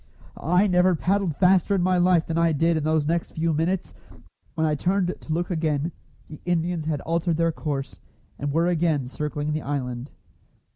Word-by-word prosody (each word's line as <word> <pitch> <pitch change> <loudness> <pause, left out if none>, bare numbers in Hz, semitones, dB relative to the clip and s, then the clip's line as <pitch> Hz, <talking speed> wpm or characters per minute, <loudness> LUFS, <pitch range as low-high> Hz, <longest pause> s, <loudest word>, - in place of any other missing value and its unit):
I 180 +4 +4
never 180 -1 +3
paddled 185 -1 0
faster 190 +3 +3
in 180 - +1
my 185 0 +2
life 175 -2 +3
than 165 - -3
I 165 -1 +3
did 165 +3 +2
in 155 - -1
those 155 -1 +1
next 170 +2 -1
few 165 0 0
minutes. 170 +5 -1 0.6
When 160 0 +1
I 155 - +1
turned 180 +4 0
to - - -8
look 175 +3 -1
again, 160 -1 0 0.4
the 150 - -11
Indians 170 -2 -1
had 150 -3 -1
altered 165 0 0
their 165 0 +2
course, 145 -4 -4 0.4
and 145 0 -2
were 165 +3 +2
again 165 -6 +1
circling 150 +2 -3
the 155 - -2
island. 130 -2 -4
165 Hz, 185 wpm, -24 LUFS, 150-175 Hz, 0.6 s, I